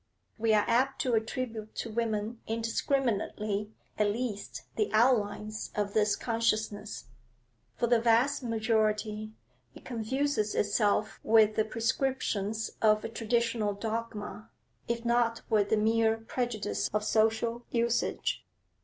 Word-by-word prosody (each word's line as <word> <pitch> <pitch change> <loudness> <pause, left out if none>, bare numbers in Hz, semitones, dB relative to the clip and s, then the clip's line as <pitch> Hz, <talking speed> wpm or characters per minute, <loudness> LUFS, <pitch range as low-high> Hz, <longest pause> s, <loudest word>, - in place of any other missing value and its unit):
We 225 0 +2
are 210 - +4
apt 260 +3 +2
to 250 - 0
attribute 220 -1 -2
to 230 - -4
women 220 0 -2
indiscriminately 225 -3 -1 0.3
at 210 - +4
least 215 -1 -4
the 425 - +1
outlines 215 -2 +1
of 205 -1 -1
this 210 -1 +3
consciousness; 215 -3 -1 0.7
for - - 0
the 235 -1 +3
vast 240 +5 +3
majority 215 -2 0 0.4
it - - -14
confuses 240 -1 -1
itself 210 +1 +1
with 215 -1 +5
the 220 - +2
prescriptions 225 -2 -1
of 215 -1 +4
a - - -3
traditional 230 -2 0
dogma, 220 0 -5 0.4
if 235 0 -2
not 235 -1 +2
with 205 -2 +3
the 220 - +3
mere 225 +1 +3
prejudice 225 - -2
of 210 0 0
social 225 +2 +1
usage. 235 0 0
225 Hz, 120 wpm, -30 LUFS, 215-235 Hz, 0.7 s, with